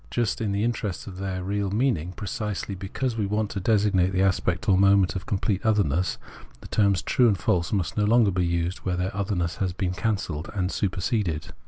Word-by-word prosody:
Just 120 Hz, -1 st, -1 dB
in 105 Hz, -3 st, 0 dB
the 100 Hz, +1 st, 0 dB
interest 110 Hz, -5 st, -2 dB
of 95 Hz, -2 st, -9 dB
their 95 Hz, -1 st, -3 dB
real 100 Hz, +1 st, -1 dB
meaning, 100 Hz, -, 0 dB
precisely 105 Hz, +1 st, -4 dB
because 100 Hz, +6 st, -3 dB
we 105 Hz, -3 st, -1 dB
want 105 Hz, +1 st, -1 dB
to 100 Hz, -, -3 dB
designate 100 Hz, -2 st, +2 dB
the 95 Hz, +1 st, +2 dB
aspect 95 Hz, -2 st, 0 dB
or 100 Hz, -, +5 dB
moment 100 Hz, -1 st, +4 dB
of 90 Hz, -, -5 dB
complete 100 Hz, -1 st, -1 dB
otherness, 95 Hz, -6 st, +1 dB, 0.4 s
the -, -, -10 dB
terms 100 Hz, -4 st, +2 dB
true 125 Hz, -, +3 dB
and 105 Hz, -4 st, +2 dB
false 85 Hz, 0 st, 0 dB
must 95 Hz, -3 st, -1 dB
no 105 Hz, -, +3 dB
longer 110 Hz, -1 st, +4 dB
be 90 Hz, 0 st, 0 dB
used 85 Hz, +1 st, -1 dB
where 90 Hz, -1 st, -2 dB
their 95 Hz, +2 st, -2 dB
otherness 95 Hz, -5 st, -1 dB
has 95 Hz, -2 st, -1 dB
been 90 Hz, -1 st, -2 dB
can 110 Hz, +4 st, 0 dB
celled 75 Hz, -4 st, -5 dB
and 90 Hz, -1 st, 0 dB
superseded. 90 Hz, -3 st, -1 dB
95 Hz, 205 wpm, -25 LUFS, 90-105 Hz, 0.4 s, or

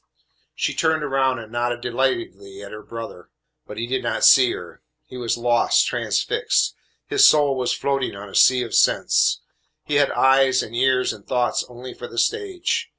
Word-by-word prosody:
She -, -, -2 dB
turned 160 Hz, -1 st, 0 dB
around 135 Hz, -2 st, 0 dB
and 110 Hz, -2 st, -10 dB
nodded 120 Hz, 0 st, -2 dB
delightedly 115 Hz, -6 st, -3 dB
at 100 Hz, -, -10 dB
her 105 Hz, -, -9 dB
brother, 115 Hz, -7 st, -9 dB, 0.4 s
but 105 Hz, -, -10 dB
he 115 Hz, -, -3 dB
did 130 Hz, +1 st, -2 dB
not 120 Hz, -, 0 dB
see 130 Hz, -2 st, +6 dB
her. 90 Hz, -, -10 dB, 0.2 s
He 140 Hz, -, -13 dB
was 120 Hz, -2 st, -2 dB
lost, 120 Hz, 0 st, +2 dB
transfixed. -, -, -1 dB, 0.3 s
His -, -, +2 dB
soul 145 Hz, -3 st, +3 dB
was 125 Hz, -2 st, -1 dB
floating 135 Hz, -5 st, -2 dB
on 100 Hz, +1 st, -9 dB
a 100 Hz, -, -14 dB
sea 130 Hz, -1 st, +4 dB
of 115 Hz, -, -8 dB
sense. -, -, +2 dB, 0.4 s
He 145 Hz, -, 0 dB
had 145 Hz, -1 st, +3 dB
eyes 135 Hz, 0 st, +3 dB
and 115 Hz, -, -9 dB
ears 130 Hz, +1 st, +1 dB
and 100 Hz, -, -15 dB
thoughts 125 Hz, -1 st, 0 dB
only 125 Hz, +1 st, -10 dB
for 120 Hz, -, -9 dB
the 115 Hz, -, -12 dB
stage. 390 Hz, -, -1 dB
125 Hz, 180 wpm, -21 LUFS, 115-135 Hz, 0.4 s, see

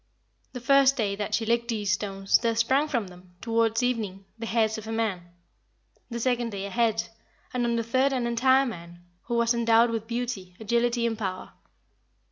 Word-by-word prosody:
The 250 Hz, -, -5 dB
first 275 Hz, +2 st, +4 dB
day 205 Hz, -4 st, 0 dB
that 205 Hz, -1 st, -1 dB
she 225 Hz, -, -1 dB
licked 235 Hz, +1 st, +1 dB
these 210 Hz, -4 st, -1 dB
stones 195 Hz, 0 st, +1 dB
there 230 Hz, -1 st, 0 dB
sprang 260 Hz, +6 st, +2 dB
from 235 Hz, -10 st, -2 dB
them, 180 Hz, 0 st, -17 dB
towards 230 Hz, 0 st, +1 dB
evening, 210 Hz, -6 st, -2 dB
the 230 Hz, 0 st, -6 dB
hairs 220 Hz, -1 st, +1 dB
of 220 Hz, -, -10 dB
a -, -, -4 dB
man, 205 Hz, -6 st, -2 dB, 0.8 s
the 235 Hz, -1 st, -4 dB
second 245 Hz, -1 st, 0 dB
day 200 Hz, -1 st, -4 dB
a 200 Hz, -, -6 dB
head, 225 Hz, -1 st, +1 dB, 0.5 s
and 245 Hz, -1 st, 0 dB
on 235 Hz, -, 0 dB
the 230 Hz, -, 0 dB
third 260 Hz, +4 st, +2 dB
an 255 Hz, -3 st, -1 dB
entire 260 Hz, +3 st, +3 dB
man, 175 Hz, -6 st, -8 dB, 0.2 s
who 240 Hz, -, -1 dB
was 235 Hz, 0 st, +3 dB
endowed 230 Hz, 0 st, +4 dB
with 225 Hz, -1 st, -3 dB
beauty, 230 Hz, -7 st, -4 dB
agility 235 Hz, +2 st, +1 dB
and 225 Hz, -1 st, -1 dB
power. 185 Hz, -3 st, -4 dB
230 Hz, 190 wpm, -26 LUFS, 205-240 Hz, 0.8 s, first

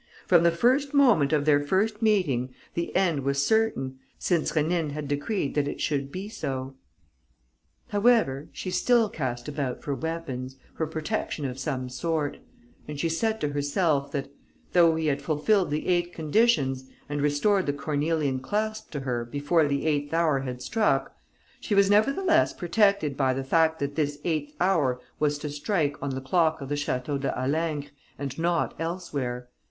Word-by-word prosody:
From 175 Hz, -2 st, +5 dB
the 170 Hz, -, +5 dB
first 260 Hz, -, +2 dB
moment 240 Hz, -, +5 dB
of 150 Hz, -2 st, +2 dB
their 145 Hz, -2 st, +5 dB
first 200 Hz, +9 st, 0 dB
meeting, 140 Hz, -, +1 dB, 0.2 s
the 170 Hz, 0 st, -3 dB
end 175 Hz, -6 st, +2 dB
was 140 Hz, +1 st, 0 dB
certain, 140 Hz, -13 st, +1 dB, 0.2 s
since 170 Hz, -4 st, 0 dB
Rénine 155 Hz, -1 st, 0 dB
had 150 Hz, -1 st, -4 dB
decreed 145 Hz, +4 st, -1 dB
that 145 Hz, -1 st, +1 dB
it -, -, -5 dB
should 140 Hz, -2 st, -1 dB
be 190 Hz, +5 st, -5 dB
so. 135 Hz, -11 st, -4 dB, 1.2 s
However, 205 Hz, -, +2 dB
she 185 Hz, -, -5 dB
still 235 Hz, +1 st, +3 dB
cast 125 Hz, -7 st, -4 dB
about 140 Hz, -4 st, -3 dB
for 145 Hz, -, -2 dB
weapons, 135 Hz, -5 st, -4 dB, 0.2 s
for 160 Hz, -, -2 dB
protection 155 Hz, -1 st, -3 dB
of 130 Hz, 0 st, -4 dB
some 130 Hz, -1 st, -3 dB
sort; 150 Hz, +3 st, -2 dB, 0.5 s
and 150 Hz, -1 st, -6 dB
she 165 Hz, -, 0 dB
said 220 Hz, +7 st, 0 dB
to 150 Hz, -, 0 dB
herself 145 Hz, 0 st, 0 dB
that, 140 Hz, -1 st, -4 dB, 0.4 s
though 170 Hz, -2 st, +5 dB
he 160 Hz, 0 st, -1 dB
had 145 Hz, -2 st, 0 dB
fulfilled 165 Hz, +7 st, +1 dB
the 150 Hz, +1 st, -2 dB
eight 175 Hz, -1 st, +1 dB
conditions 150 Hz, -, +1 dB, 0.2 s
and 145 Hz, 0 st, -2 dB
restored 150 Hz, +7 st, +2 dB
the -, -, +3 dB
cornelian 145 Hz, -1 st, -1 dB
clasp 215 Hz, +9 st, -2 dB
to 145 Hz, -, -3 dB
her 125 Hz, -3 st, -2 dB
before 145 Hz, +6 st, +1 dB
the 140 Hz, 0 st, -1 dB
eighth 145 Hz, 0 st, 0 dB
hour 160 Hz, -4 st, +2 dB
had 125 Hz, -2 st, -5 dB
struck, 220 Hz, -, +1 dB, 0.4 s
she 210 Hz, -, -1 dB
was 200 Hz, 0 st, +5 dB
nevertheless 275 Hz, -, +3 dB
protected 195 Hz, -5 st, +2 dB
by 130 Hz, -2 st, +1 dB
the 135 Hz, -, -2 dB
fact 160 Hz, +3 st, +2 dB
that 140 Hz, -2 st, -3 dB
this 145 Hz, -1 st, -1 dB
eighth 155 Hz, -3 st, -2 dB
hour 155 Hz, -9 st, +2 dB, 0.2 s
was 150 Hz, -1 st, +1 dB
to 150 Hz, -, -5 dB
strike 145 Hz, -1 st, 0 dB
on 140 Hz, -, -2 dB
the 135 Hz, -, -4 dB
clock 160 Hz, +4 st, +2 dB
of 135 Hz, -2 st, -7 dB
the -, -, -1 dB
Château 145 Hz, -1 st, -2 dB
de 135 Hz, -, 0 dB
Halingre 145 Hz, +1 st, -1 dB, 0.3 s
and 140 Hz, +1 st, -5 dB
not 170 Hz, 0 st, +1 dB
elsewhere. 140 Hz, -8 st, -3 dB
150 Hz, 170 wpm, -26 LUFS, 140-175 Hz, 1.2 s, From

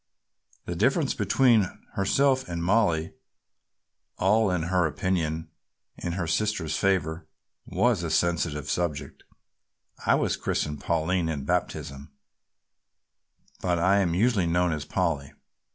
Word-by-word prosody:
The 85 Hz, -, -4 dB
difference 135 Hz, -, +2 dB
between 110 Hz, 0 st, +3 dB, 0.2 s
herself 130 Hz, +5 st, +2 dB
and 85 Hz, -1 st, -3 dB
Mollie, 85 Hz, -5 st, +2 dB, 1.0 s
all 105 Hz, +2 st, +3 dB
in 90 Hz, -3 st, 0 dB
her 90 Hz, 0 st, +2 dB
opinion 80 Hz, -3 st, -2 dB, 0.4 s
in 85 Hz, -, -4 dB
her 90 Hz, -1 st, -2 dB
sister's 80 Hz, -2 st, -1 dB
favor, 85 Hz, -4 st, 0 dB, 0.4 s
was 120 Hz, -7 st, +1 dB
a 85 Hz, -, -3 dB
sensitive 80 Hz, -2 st, 0 dB
subject. 85 Hz, -5 st, -3 dB, 0.8 s
"I -, -, +4 dB
was -, -, 0 dB
christened 75 Hz, -1 st, -2 dB
Pauline 85 Hz, +1 st, 0 dB
in 75 Hz, -4 st, -3 dB
baptism 70 Hz, -4 st, -3 dB, 1.5 s
but 90 Hz, -1 st, +1 dB
I 95 Hz, +4 st, +3 dB
am 85 Hz, -4 st, +1 dB
usually 105 Hz, -3 st, +2 dB
known 90 Hz, +1 st, +2 dB
as 75 Hz, -1 st, -4 dB
Polly. 80 Hz, -8 st, -1 dB
90 Hz, 120 wpm, -26 LUFS, 80-100 Hz, 1.5 s, I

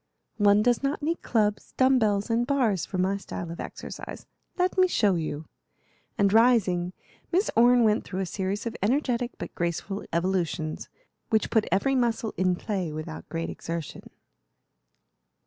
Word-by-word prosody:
"One 205 Hz, 0 st, +5 dB
does 245 Hz, 0 st, +2 dB
not 280 Hz, +2 st, -2 dB
need 330 Hz, +3 st, -1 dB
clubs, 210 Hz, -3 st, 0 dB
dumb 260 Hz, 0 st, +5 dB
bells, 205 Hz, 0 st, +1 dB
and 235 Hz, +1 st, +1 dB
bars 240 Hz, -, +1 dB
for 185 Hz, -, -4 dB
my 190 Hz, +2 st, +1 dB
style 175 Hz, -3 st, -6 dB
of 170 Hz, -, -8 dB
exercise. -, -, -7 dB, 0.3 s
Let 365 Hz, 0 st, +1 dB
me 370 Hz, -1 st, +5 dB
show 210 Hz, -, +2 dB
you;" 155 Hz, -2 st, -3 dB, 0.7 s
and 200 Hz, -2 st, +3 dB
rising, 195 Hz, -7 st, +3 dB, 0.4 s
Miss 375 Hz, +4 st, +2 dB
Orne 240 Hz, +1 st, +6 dB
went 215 Hz, 0 st, +3 dB
through 190 Hz, 0 st, -4 dB
a -, -, -1 dB
series 195 Hz, +3 st, -3 dB
of 230 Hz, -, -3 dB
energetic 245 Hz, +2 st, 0 dB
but -, -, -7 dB
graceful 175 Hz, +4 st, -3 dB
evolutions, 170 Hz, -3 st, -1 dB, 0.4 s
which 220 Hz, -1 st, +1 dB
put 220 Hz, -2 st, +2 dB
every 200 Hz, +9 st, +2 dB
muscle 235 Hz, -3 st, 0 dB
in 185 Hz, -1 st, +2 dB
play 185 Hz, -4 st, -3 dB
without 150 Hz, -, -7 dB
great 165 Hz, 0 st, -3 dB
exertion. 165 Hz, -2 st, -6 dB
205 Hz, 155 wpm, -27 LUFS, 180-240 Hz, 0.7 s, Orne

